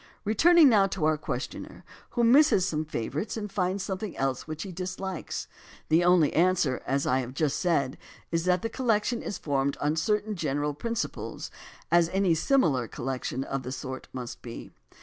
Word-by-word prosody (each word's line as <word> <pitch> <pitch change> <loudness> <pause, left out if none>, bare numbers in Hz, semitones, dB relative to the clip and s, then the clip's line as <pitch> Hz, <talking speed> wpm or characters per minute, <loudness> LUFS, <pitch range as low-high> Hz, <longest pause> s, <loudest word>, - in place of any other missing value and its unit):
Returning 320 +10 +6
now 205 -6 +5
to 185 -4 -2
our 155 0 +3
questioner 140 -3 -6 0.3
who 240 - +4
misses 235 -6 +5
some 155 -2 -1
favorite 150 - -3
and 210 -2 -5
finds 190 0 -1
something 195 0 -4
else 135 0 -1
which 155 0 -5
he 195 - -7
dislikes, 185 0 -5 0.4
the 160 +2 +4
only 175 -4 +4
answer, 170 -6 +2
as 135 +1 0
I 130 - +2
have 130 0 -5
just 150 -2 0
said, 140 -7 0 0.3
is 165 0 0
that 180 -1 +2
the - - +1
col 260 +1 -5
lection 225 +2 +2
is 200 - -4
formed 140 -1 -1
on 150 +1 0
certain 210 +5 0
general 145 -3 -1
principles, 230 +9 -4 0.4
as 170 -1 +4
any 190 -2 +2
similar 160 - +2
collection 130 +1 -3
of 135 0 -3
the 125 0 -6
sort 130 -1 -6
must 125 -2 -7
be. 115 -1 -9
165 Hz, 175 wpm, -28 LUFS, 140-200 Hz, 0.4 s, Returning